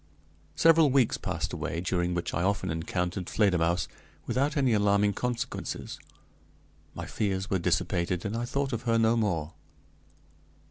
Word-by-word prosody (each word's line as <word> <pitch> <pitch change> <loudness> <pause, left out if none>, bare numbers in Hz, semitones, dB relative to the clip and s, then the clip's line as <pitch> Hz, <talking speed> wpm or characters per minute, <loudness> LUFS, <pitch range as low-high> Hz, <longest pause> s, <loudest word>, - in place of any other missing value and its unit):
Several 165 -2 +5
weeks 130 -3 +2
passed - - -3
away, 85 - -3
during 90 0 -1
which 85 - -3
I 85 - 0
often 95 -1 0
encountered 90 +2 -2
Fledermausse 90 -5 +2 0.4
without 145 +4 0
any 130 -4 +3
alarming 100 -1 +3
consequences. 120 +3 -4 1.0
My - - -5
fears 95 -2 -2
were 95 - +2
dissipated, 85 +1 0
and 105 +2 -2
I 120 +1 -2
thought 140 +1 -2
of 115 - -2
her 115 - +4
no 115 0 +3
more. 85 -9 -1
100 Hz, 140 wpm, -28 LUFS, 90-120 Hz, 1.0 s, Several